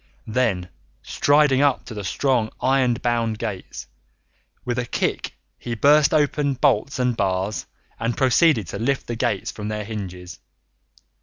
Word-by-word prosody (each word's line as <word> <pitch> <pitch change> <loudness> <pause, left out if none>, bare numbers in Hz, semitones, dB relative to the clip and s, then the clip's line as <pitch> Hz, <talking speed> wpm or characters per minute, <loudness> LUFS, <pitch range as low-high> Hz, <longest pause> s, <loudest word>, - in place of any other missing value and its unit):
Then, 110 -6 0 0.3
striding 145 -2 +3
up 140 -3 +2
to 120 - -8
the 105 -2 -6
strong 120 +2 0
iron 130 -2 +2
bound 115 -2 -1
gates, 90 - -6 0.8
with 125 0 -1
a 125 - -2
kick - - -2 0.2
he 120 - -4
burst 145 +5 +5
open 145 -2 +1
bolts 130 -1 +1
and 125 -2 +1
bars, 95 +1 -1 0.3
and 115 +1 -2
proceeded 130 - +3
to 100 - -5
lift 130 +4 -1
the 120 - -4
gates 105 -3 -1
from 105 -1 -7
their 105 0 -3
hinges. 95 -5 -7
120 Hz, 145 wpm, -22 LUFS, 105-135 Hz, 0.8 s, burst